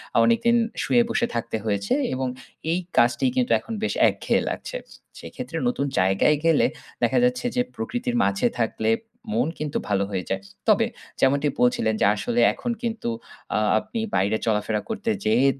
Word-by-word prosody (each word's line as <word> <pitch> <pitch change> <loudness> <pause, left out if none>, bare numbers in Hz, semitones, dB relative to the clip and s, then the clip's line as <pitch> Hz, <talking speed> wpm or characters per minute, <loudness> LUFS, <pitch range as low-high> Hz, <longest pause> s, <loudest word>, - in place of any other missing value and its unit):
আ - - +4
অনেকদিন 235 0 +3 0.3
শুয়ে 240 -1 +4
বসে 235 - +1
থাকা 115 -1 -2
হয়েছে 100 -2 0 0.2
এবং 130 0 -1 0.4
এই 175 - +1 0.2
কাজটি 120 - +4
কিন্তু 255 -1 +1
এখন 230 - -8
বেশ - - 0 0.2
একঘেয়ে - - 0
লাগছে। - - -5 0.4
সেক্ষেত্রে - - -7
নতুন 195 - 0
জায়গায় 95 +11 +3
গেলে 165 - +4 0.4
দেখা - - +3
যাচ্ছে 250 0 +1
যে 245 - +3
প্রকৃতির 245 0 -3
মাঝে 240 +5 +2
থাকলে - - 0 0.4
মন 235 -4 +2
কিন্তু 150 -1 -2
ভালো 100 -1 +1
হয়ে 95 -2 -2
যায়। 95 0 -1 0.3
তবে - - +5 0.3
যেমনটি 140 +2 +3
বলছিলেন 125 -3 +2
যে - - +5
আসলে 240 - -1
এখন 240 - -3
কিন্তু 225 - -2 0.5
আ - - +3 0.2
আপনি 220 +2 -6 0.2
বাইরে 100 +3 +2
চলাফেরা 105 -1 0
করতে 225 0 -1
যেয়ে 115 +5 +3
150 Hz, 160 wpm, -24 LUFS, -, 0.5 s, তবে